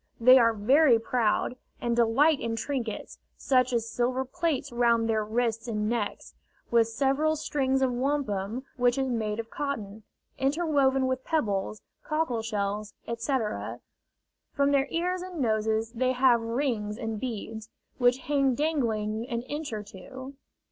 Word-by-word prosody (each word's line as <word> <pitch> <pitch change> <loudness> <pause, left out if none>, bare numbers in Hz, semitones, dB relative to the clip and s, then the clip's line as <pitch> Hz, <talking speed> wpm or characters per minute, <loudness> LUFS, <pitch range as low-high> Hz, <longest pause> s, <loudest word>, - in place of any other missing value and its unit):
They 255 +3 +8
are 230 -1 +4
very 255 +5 +5
proud, 230 +1 0 0.2
and 235 -1 0
delight 270 +6 +4
in 230 -1 -2
trinkets, 235 -1 -4 0.2
such 255 -1 +2
as 230 -2 0
silver 245 +3 -1
plates 290 0 -2
round 235 -1 +2
their 220 -1 +1
wrists 230 +1 -1
and 210 -2 -1
necks, 225 -2 -3 0.4
with 230 -1 +4
several 275 +6 +1
strings 270 -3 0
of 255 -2 +1
wampum, 250 -4 -1
which 245 0 +2
is 265 -1 0
made 215 -2 -2
of 225 0 -6
cotton, 220 -8 -4 0.4
interwoven 275 -2 +2
with 260 0 -1
pebbles, 215 -9 -1 0.2
cockle 305 -7 -1
shells, 210 -1 -3
etc. 235 -1 -2 0.7
From 280 -1 +2
their 275 -1 +2
ears 360 +2 -1
and 365 -2 -7
noses 220 -2 0
they 255 +2 0
have 250 -2 +4
rings 230 -3 -2
and 225 -2 -4
beads, 220 -2 -5 0.3
which 245 +1 +3
hang 275 -2 +2
dangling 230 -6 -1
an 235 -1 -2
inch 295 +2 -5
or 215 -2 -4
two. 260 +7 -10
240 Hz, 145 wpm, -28 LUFS, 225-270 Hz, 0.7 s, They